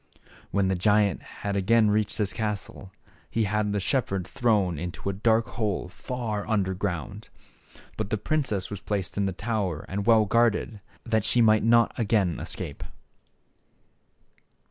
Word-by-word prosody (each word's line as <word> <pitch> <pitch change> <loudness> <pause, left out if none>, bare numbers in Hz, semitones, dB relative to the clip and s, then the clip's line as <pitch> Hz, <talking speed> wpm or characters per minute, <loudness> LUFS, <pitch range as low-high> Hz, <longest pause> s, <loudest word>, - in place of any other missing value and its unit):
When 100 -1 +1
the 95 - +1
giant 100 0 +2
had 100 0 -5
again 105 +2 +3
reached 105 0 0
his 105 -3 0
castle 105 -3 -4 0.4
he 115 - 0
had 105 0 0
the 105 - 0
shepherd 95 -4 -1
thrown 100 -8 +1
into 90 +3 -4
a - - -7
dark 110 +3 +2
hole 105 -5 -2
far 110 0 -4
under 100 -4 +1
ground. 100 +3 -4 0.7
But 110 -2 -3
the 110 - 0
princess 110 -6 -1
was 105 - -5
placed 100 -3 -3
in 100 -1 +1
the - - -1
tower 95 -5 -2
and 100 +2 -3
well 110 -2 +6
guarded, 115 -1 +1 0.3
that 110 -3 +1
she 120 - +2
might 110 -2 +5
not 115 +1 +4
again 100 -6 +1
escape. - - -5
105 Hz, 150 wpm, -26 LUFS, 95-110 Hz, 0.7 s, well